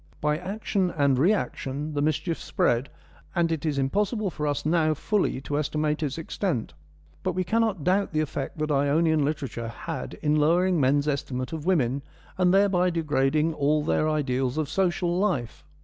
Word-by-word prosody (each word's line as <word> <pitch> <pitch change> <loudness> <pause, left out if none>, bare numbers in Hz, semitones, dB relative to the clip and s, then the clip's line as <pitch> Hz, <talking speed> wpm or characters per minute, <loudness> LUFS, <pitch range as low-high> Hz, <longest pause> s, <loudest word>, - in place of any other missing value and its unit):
By 150 +1 0
action 195 0 -1
and 140 -5 +2
reaction 150 -5 0
the 145 - -1
mischief 155 +3 0
spread, 120 +3 0 0.5
and 170 -2 +2
it 160 -1 -2
is 145 -2 -1
impossible 200 - 0
for 150 -1 -3
us 145 0 -2
now 155 -1 +2
fully 195 -2 0
to 145 +1 -2
estimate 150 +1 -1
its 145 -2 -2
extent. 165 - -2 0.5
But - - -1
we 185 - 0
cannot 220 -3 0
doubt 195 +4 +2
the 155 - 0
effect 145 -2 -3
that 155 0 -1
Ionian 150 +2 +2
literature 140 -6 -3
had 155 +8 -6
in 150 0 +3
lowering 175 +4 +3
men's 140 +2 +2
estimate 130 -2 -2
of 160 +1 -5
women, 140 -7 +2 0.3
and 180 -1 +3
thereby 190 -2 +3
degrading 155 -1 +1
all 150 +1 +1
their 155 0 +1
ideals 135 -3 0
of 155 -3 -1
social 175 -1 0
life. 145 - -1
155 Hz, 165 wpm, -26 LUFS, 140-175 Hz, 0.5 s, in